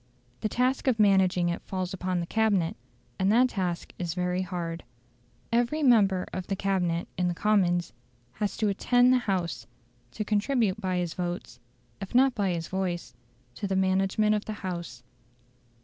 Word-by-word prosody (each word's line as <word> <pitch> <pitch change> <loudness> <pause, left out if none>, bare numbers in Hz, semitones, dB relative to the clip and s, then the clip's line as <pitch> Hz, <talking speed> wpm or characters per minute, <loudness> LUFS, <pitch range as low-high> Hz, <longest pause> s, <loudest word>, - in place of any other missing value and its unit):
The 215 - -1
task 255 +4 0
of 240 -4 +2
managing 190 -4 +4
it 170 - -3
falls 185 -1 -4
upon 185 -1 -2
the - - -3
Cabinet, 200 -4 +1 0.4
and 190 +1 +3
that 250 +3 +5
task 180 -5 -3
is 175 -2 -3
very 180 0 0
hard. 175 -3 -4 0.7
Every 240 +7 +1
member 200 -8 +4
of 185 -1 -4
the 195 - -1
Cabinet 180 -4 0
in 180 - +2
the 175 - -1
Commons 180 -4 +1 0.4
has 210 -2 -3
to 215 - +1
"attend 245 +5 +4
the 255 - +4
House"; 180 -4 -2 0.5
to 215 - -3
contribute 215 -1 +1
by 185 -2 -1
his 175 -2 -2
votes, 175 -8 -5 0.4
if 195 +4 -7
not 265 +1 +5
by 200 -4 0
his 170 -2 -2
voice, 180 -7 -3 0.4
to 200 - -4
the 190 - -1
management 190 +3 +2
of 210 -1 -1
the 215 - -4
House. 170 -9 -5
190 Hz, 165 wpm, -27 LUFS, 175-215 Hz, 0.7 s, that